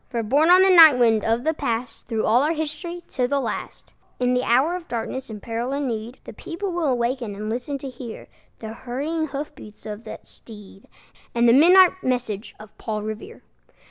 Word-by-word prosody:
For, 235 -2 -2
borne 285 +9 +2
on 365 +1 +7
the 380 -1 +5
night 320 -6 +9
wind 225 -3 +3
of 230 +2 0
the 315 +2 +1
Past, 230 -5 -4
Through 225 -2 -1
all 235 +4 +4
our 305 +3 +1
history, 315 +3 -5
to 250 -1 -1
the 280 +2 0
last, - - -6 0.3
In 250 0 +1
the 250 - +1
hour 265 +9 +2
of 360 -2 -8
darkness 240 +3 -5
and 215 -1 -7
peril 235 +5 -4
and 285 0 -2
need, 230 +1 -5
The - - -10
people 370 +3 -5
will 315 -8 0
waken 235 -3 -2
and 215 +2 -5
listen 250 +4 -3
to 275 - -8
hear 240 -2 -9 0.3
The 220 -1 -8
hurrying 290 +7 -3
hoof 285 +1 -6
beats 210 0 -14
of 210 +1 -7
that - - -9
steed, 205 -3 -14 0.5
And 235 0 +3
the 230 - +6
midnight 355 +7 +7
message 245 -5 -3
of 215 0 -14
Paul 215 -2 -4
Revere. 220 - -8
250 Hz, 205 wpm, -23 LUFS, 225-305 Hz, 0.5 s, night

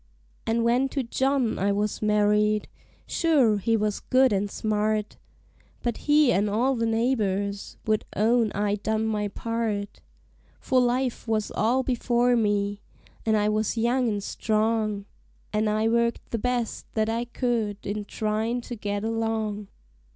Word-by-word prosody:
And 230 +1 +1
when 250 +3 +2
to 275 0 -2
John 265 0 0
I 200 +1 +2
was 205 +1 -1
married, 210 0 +2 0.4
sure 275 -11 +3
he 225 +3 +1
was 210 -1 -1
good 260 -2 +3
and 200 +1 0
smart, 215 0 -1 0.7
But 240 -2 -1
he 295 -3 +6
and 205 0 +2
all 245 +6 +1
the 230 -1 0
neighbors 205 -4 -1
would 215 -1 +1
own 225 +1 +3
I 205 0 0
done 220 +1 -1
my 210 -2 -1
part; 210 -1 -3 0.6
For 255 -1 +2
life 250 0 0
was 215 -1 0
all 245 +5 +1
before 245 -1 +2
me, 205 -2 0 0.5
an' 220 - +4
I 210 0 +2
was 215 +2 0
young 240 +2 +2
an' 205 -2 -2
strong, 215 -1 0 0.5
And 215 0 +1
I 215 +1 +1
worked 235 +1 0
the 230 - -1
best 245 -1 -2
that 215 -1 +1
I 230 +2 -1
could 230 -4 -2
in 210 +1 -3
tryin' 220 +3 -1
to 240 - -7
get 205 -1 -3
along. 220 -2 -2
220 Hz, 150 wpm, -26 LUFS, 210-240 Hz, 0.7 s, he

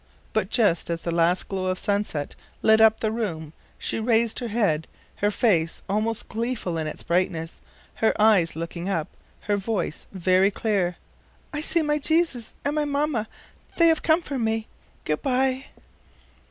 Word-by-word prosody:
But - - +1
just 205 -10 +2
as 165 0 -3
the 170 - -2
last 170 +2 +2
glow 190 -1 -2
of 185 0 0
sunset 200 -9 -1 0.3
lit 220 0 +6
up 220 0 +6
the 220 - +1
room 165 -9 -3 0.2
she - - -2
raised 230 0 +2
her 245 - -3
head, 205 -9 0 0.3
her 205 - +2
face 190 -8 +1
almost 220 +3 -1
gleeful 225 -6 -2
in 155 - -2
its - - -7
brightness, 170 -2 -1 0.4
her 220 - +1
eyes 205 -7 +4
looking 170 +2 -4
up, 165 -6 -1 0.3
her 205 -1 0
voice 200 -5 -3
very 185 +1 +3
clear: 195 -4 0 0.6
"I 295 - -2
see 330 +1 +1
my 300 0 +1
Jesus 315 -6 0
and 285 - +1
my 300 -1 +1
mamma; 285 -6 0 0.5
they 335 -1 +6
have 320 -1 +2
come 325 +2 +3
for 275 -4 -4
me. 220 -1 0 0.4
Good 150 0 -1
by! 265 0 +1
215 Hz, 165 wpm, -25 LUFS, 175-245 Hz, 0.6 s, lit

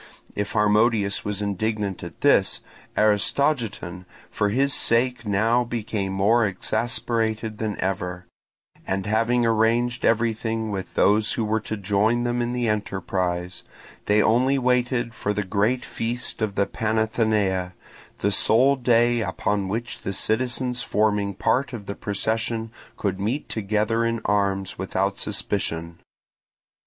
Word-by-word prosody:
If 100 0 -2
Harmodius 105 -1 +2
was 105 0 -3
indignant 105 -1 -2
at 85 -1 -9
this, - - +3 0.4
Aristogiton 105 - +1 0.3
for 105 -1 0
his 135 +6 +1
sake 120 0 +1
now 110 +5 +2
became 110 -4 -3
more 105 +5 +3
exasperated 110 +2 -1
than 110 -2 -3
ever; 90 -1 -3 0.6
and 95 0 -1
having 115 +3 +2
arranged 115 +2 +2
everything 115 -1 0
with 95 -2 -5
those 105 +1 +3
who 115 - -1
were 110 +1 +1
to 110 0 -5
join 105 +4 +1
them 120 0 0
in 120 0 -1
the 120 -1 -1
enterprise, 90 -4 -2 0.5
they 105 +1 +4
only 130 +5 +3
waited 125 -2 +1
for 105 -1 -2
the 105 +1 -1
great 105 +6 0
feast 120 +1 -3
of 105 -2 -1
the 100 - +2
Panathenaea, 110 -4 0 0.4
the 100 - 0
sole 125 +7 +4
day 120 -1 +3
upon 100 0 -1
which 115 +4 -4
the 100 - -3
citizens 125 +3 0
forming 105 -2 0
part 135 +7 0
of 105 -4 -6
the 100 - -4
procession 110 +3 -2 0.3
could 95 -2 -2
meet 115 +9 -2
together 110 +2 0
in 115 0 0
arms 100 -2 0
without 95 +1 -1
suspicion. 85 +1 -3
110 Hz, 130 wpm, -24 LUFS, 100-120 Hz, 0.6 s, they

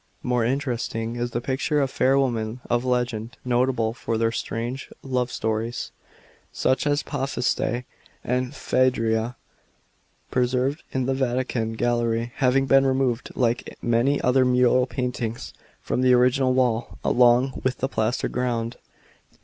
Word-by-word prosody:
More 125 -1 +1
interesting 120 -3 -2
is 120 0 -2
the 120 0 -3
picture 140 +5 0
of 135 -2 0
fair 135 +1 +3
women 120 -3 0
of 120 0 +2
legend, 120 -3 -1
notable 120 -2 +1
for 115 -2 -3
their 115 0 +1
strange 120 +3 -4
love 125 -2 -1
stories 110 +2 -2 0.3
— - - -28 0.2
such 130 +3 +1
as 145 0 +1
Pasiphae 130 -3 -1 0.4
and 125 +3 -1
Phaedra 120 -3 +1 0.5
— - - -41
preserved 130 +4 +1
in 130 -1 -1
the 135 - +1
Vatican 125 -3 -1
gallery, 120 0 0
having 135 0 +3
been 135 0 +5
removed, 130 -2 0
like 120 -2 -1
many 120 +4 +2
other 130 +1 +3
mural 125 0 +3
paintings, 125 -3 -4 0.3
from - - -1
the 130 0 +5
original 130 +1 +3
wall, 120 -3 0
along 125 +2 +3
with 130 -1 0
the 130 - -1
plaster 110 -1 -1
ground. 120 -2 -2
125 Hz, 140 wpm, -24 LUFS, 120-130 Hz, 0.5 s, been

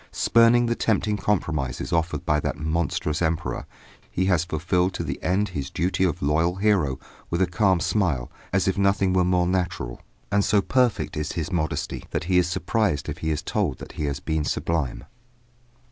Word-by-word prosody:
Spurning 115 +1 +4
the 120 - +1
tempting 105 -2 +1
compromises 80 -9 -1
offered 80 -2 0
by 75 0 +2
that - - -2
monstrous 80 0 -1
emperor, 80 -1 -1 0.4
he 95 - -1
has 90 -4 +3
fulfilled 90 +3 0
to - - -2
the - - -4
end 100 +3 +1
his 70 -6 -4
duty 90 +3 0
of 85 -6 0
loyal 80 +5 +2
hero 95 -9 +2 0.3
with 85 - -1
a 95 - +4
calm 95 0 +2
smile, 80 - 0 0.2
as 95 0 +1
if 95 +1 +1
nothing 100 -1 +2
were 90 -1 +3
more 90 0 +2
natural. 90 -9 -2 0.3
And 100 0 +3
so 100 +2 +3
perfect 125 +3 +1
is 75 0 -3
his 85 +2 -3
modesty 80 -4 -2
that - - -2
he 90 +1 +3
is 90 - +2
surprised 95 -3 0
if - - -5
he 80 - -2
is 75 -2 -1
told - - -1
that - - -9
he 75 - -3
has 70 -1 -2
been 80 +1 -1
sublime. 75 -4 -1
90 Hz, 185 wpm, -24 LUFS, 80-95 Hz, 0.4 s, Spurning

